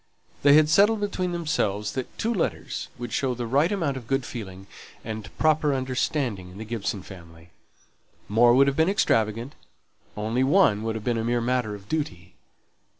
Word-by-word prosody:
They 140 0 +6
had 155 0 +6
settled 205 +7 +4
between 190 -3 -2
themselves 105 - -1
that 130 -2 -6
two 230 +2 0
letters 190 - -3
would 120 -1 -6
show 130 -2 0
the 120 0 -4
right 140 - +2
amount 165 -9 -1
of 120 -4 -9
good 135 -1 0
feeling 95 -5 -8 0.4
and 110 -1 -6
proper 155 -2 +2
understanding 130 -6 -2
in 90 - -13
the 110 - -7
Gibson 105 -4 -3
family: 85 -3 -14 0.8
more 120 +4 +5
would 135 +1 +6
have 140 0 0
been 160 +4 +3
extravagant; 115 - +1 0.6
only 110 +4 0
one 135 - +4
would 110 0 -2
have 110 - -5
been 120 -1 0
a - - -2
mere 120 +1 +1
matter 120 -3 -1
of 100 0 -13
duty. 95 - -4
120 Hz, 175 wpm, -25 LUFS, 105-150 Hz, 0.8 s, They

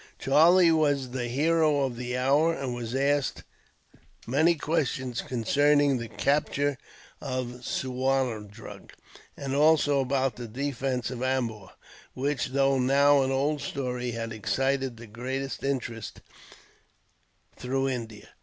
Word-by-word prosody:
Charlie 165 +5 +5
was 145 -5 +1
the 125 -1 -3
hero 155 +3 +2
of 130 -3 -1
the 125 +1 -4
hour, 140 +6 +3
and 135 -2 -4
was 120 0 -5
asked 140 +1 0 0.8
many 155 +7 +3
questions 135 -6 -2
concerning 145 +3 +2
the 115 - -5
capture 140 +3 0 0.4
of 125 -2 -4
Suwarndrug; 125 -5 -3 0.4
and 135 -1 -4
also 145 -1 +4
about 135 -1 0
the 120 -1 -6
defence 130 0 -3
of 125 - -6
Ambur, 120 -7 -2 0.5
which, 140 +1 -1
though 135 0 +2
now 140 +2 +4
an 135 - 0
old 140 +2 0
story, 125 -3 -3
had 115 -1 -4
excited 135 +3 -1
the 120 - -10
greatest 130 +5 -5
interest 120 -5 -4 1.3
through 135 +2 -1
India. 115 -5 -5
135 Hz, 120 wpm, -27 LUFS, 125-140 Hz, 1.3 s, Charlie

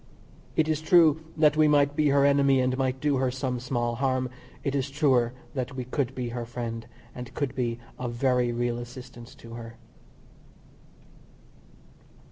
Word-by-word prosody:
It 155 - +3
is 155 -1 0
true 160 -1 +5 0.2
that 150 -1 +5
we 155 0 +5
might 145 -1 +3
be 150 -1 +3
her 140 0 +4
enemy 140 -1 +4
and 130 0 +1
might 130 0 -1
do 145 -1 +1
her 130 0 +1
some 130 -1 -2
small 120 -1 -1
harm 130 -1 0 0.3
it 140 - -1
is 140 0 -1
truer 135 -5 +2 0.2
that 130 0 -3
we 130 - -3
could 130 0 -2
be 125 -2 -3
her 120 0 -4
friend, 115 -1 -5 0.3
and 125 -1 -8
could 140 -4 -1
be 120 -2 -1 0.2
of 120 -1 -3
very 125 -1 +2
real 120 0 -1
assistance 120 -1 -10
to 115 0 -12
her. 115 -1 -9
130 Hz, 165 wpm, -27 LUFS, 120-140 Hz, 0.3 s, true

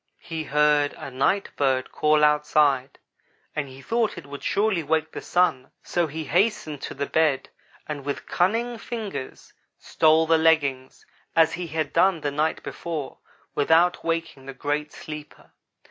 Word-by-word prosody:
He 160 -1 -5
heard 150 0 +3
a - - -8
night 140 +10 +1
bird 130 -2 0
call 150 0 +3
outside 150 -3 +3 0.6
and 150 -2 -2
he 135 +1 -12
thought 230 - 0
it 170 - -8
would 140 0 -9
surely 200 -3 +1
wake 160 +1 0
the - - -6
Sun; 175 -8 +1
so 175 -2 0
he 160 +2 -5
hastened 160 -3 0
to - - -6
the 140 +1 -2
bed 150 -3 +1 0.4
and 150 -2 -5
with 145 0 -4
cunning 230 +6 0
fingers 220 - -6 0.2
stole 160 0 +3
the 165 0 +3
leggings, 145 -5 +1 0.3
as 165 -1 +4
he 175 0 -4
had 155 -1 -3
done 170 -1 +3
the 145 - -1
night 155 +3 -1
before, 155 -6 -5 0.3
without 165 +4 +3
waking 165 -5 -3
the 135 - -7
great 150 +1 -2
sleeper. 150 -1 -10
155 Hz, 155 wpm, -25 LUFS, 145-170 Hz, 0.6 s, as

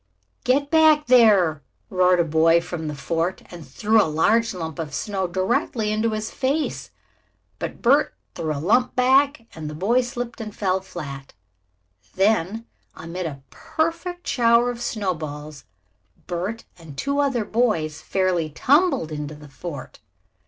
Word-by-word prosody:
"Get 280 +3 +1
back 315 -2 +5
there!" 205 - +5 0.3
roared 180 -1 +4
a - - +5
boy 165 +1 +4
from 170 -2 -5
the 150 - -4
fort 165 +5 -2
and 175 -2 -9
threw 215 +11 +3
a - - +2
large 225 +9 +2
lump 165 -4 -6
of 155 -2 -4
soft - - -3
snow 195 -3 -2
directly 210 +4 0
into 215 +2 +1
his 215 0 -3
face. 280 +4 -2 0.7
But - - -6
Bert 280 +5 +3 0.2
threw 160 -1 -3
the 145 - -2
lump 245 - +2
back 265 0 +3
and 155 -2 -6
the 150 - -7
boy 220 +10 +2
slipped 245 -1 -5
and 215 -2 -7
fell 190 -2 0
flat. 140 -7 -8 0.8
Then, 210 +2 +1 0.3
amid 170 +2 -5
a 140 -3 -8
perfect 335 +3 -3
shower 235 0 +3
of 240 -1 -8
snowballs, 155 - -4 0.6
Bert 185 +6 -4 0.2
and 155 -4 -12
two 280 - -1
other 270 -6 +1
boys 165 -11 0
fairly 180 -4 0
tumbled 280 - +2
into 150 0 -5
the 150 0 -13
fort. 145 +3 -8
190 Hz, 150 wpm, -23 LUFS, 160-240 Hz, 0.8 s, back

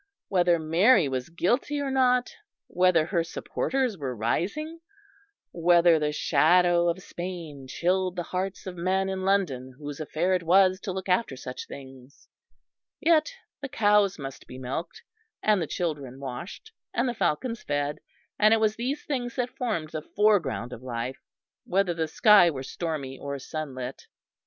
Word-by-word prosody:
Whether 175 -2 +3
Mary 165 - +4
was 130 0 -3
guilty 240 - 0
or 280 -1 -2
not, 250 -2 +2 0.3
whether 180 -3 +3
her 170 -2 0
supporters 250 +5 -2
were 130 -3 -3
rising, 205 - -2 0.7
whether 170 -1 +4
the 150 0 0
shadow 175 +3 +3
of 180 +2 -3
Spain 170 -6 -7
chilled 185 +5 0
the 175 - -2
hearts 185 +2 -4
of 185 -2 -6
men 190 +2 0
in 190 -1 -3
London 150 -10 0
whose 145 0 -7
affair 160 +4 0
it 185 - +1
was 185 +2 +4
to 190 - -4
look 190 +1 -5
after 180 - +1
such 125 0 -7
things; 135 -1 -12 0.7
yet 320 +4 +3 0.3
the 275 - -5
cows 205 -4 +3
must 135 -3 -8
be 130 - -9
milked, 130 +6 -5 0.4
and 210 -3 +3
the 160 - -2
children 145 -7 -4
washed, 140 - -7 0.2
and 240 - +1
the 245 - -1
falcons 230 +3 -1
fed; 145 0 -2 0.4
and 215 +1 +6
it - - 0
was 215 0 +1
these 260 +5 -3
things 245 -5 -3
that 250 -1 -2
formed 170 -11 -2
the 155 - -4
foreground 200 - +1
of - - -9
life, 125 +1 -4 0.4
whether 190 -1 +1
the 165 -1 -2
sky 200 +2 +6
were 135 -5 -5
stormy 140 -3 -4
or 140 0 -4
sunlit. 135 -3 -6
175 Hz, 155 wpm, -27 LUFS, 145-205 Hz, 0.7 s, and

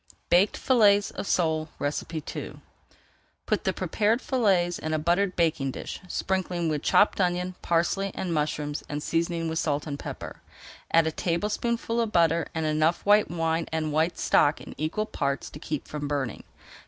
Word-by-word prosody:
BAKED 185 +4 +4
FILLETS 205 -5 +4
OF - - -6
SOLE 160 -2 +1 0.4
II 160 -3 -5 0.9
Put - - -1
the - - +3
prepared 220 +2 +1
fillets 195 -10 +1
in 155 0 -2
a - - +1
buttered 175 +4 +1
baking 155 -5 +1
dish, - - -6
sprinkling 180 -2 -1
with 150 -2 -1
chopped 205 - +3
onion, 180 0 0
parsley, 175 +4 +1
and 180 -3 -2
mushrooms, 150 -1 -2
and 145 0 -3
seasoning 165 0 -1
with 160 0 -1
salt 150 -2 -1
and 145 -2 -5
pepper. - - -7 0.5
Add 165 0 +5
a 160 - 0
tablespoonful 215 +8 -1
of 225 -2 -1
butter 170 -2 +3
and 160 -1 -1
enough 155 +2 +1
white 205 +1 +5
wine 165 -1 -1
and 155 -1 -1
white 160 +3 +1
stock 145 +1 +3
in - - -10
equal 160 +8 -2
parts 140 -9 -2
to 150 - -9
keep 150 -2 -4
from 145 -1 -4
burning. 140 -5 -3
165 Hz, 165 wpm, -27 LUFS, 155-190 Hz, 0.9 s, Add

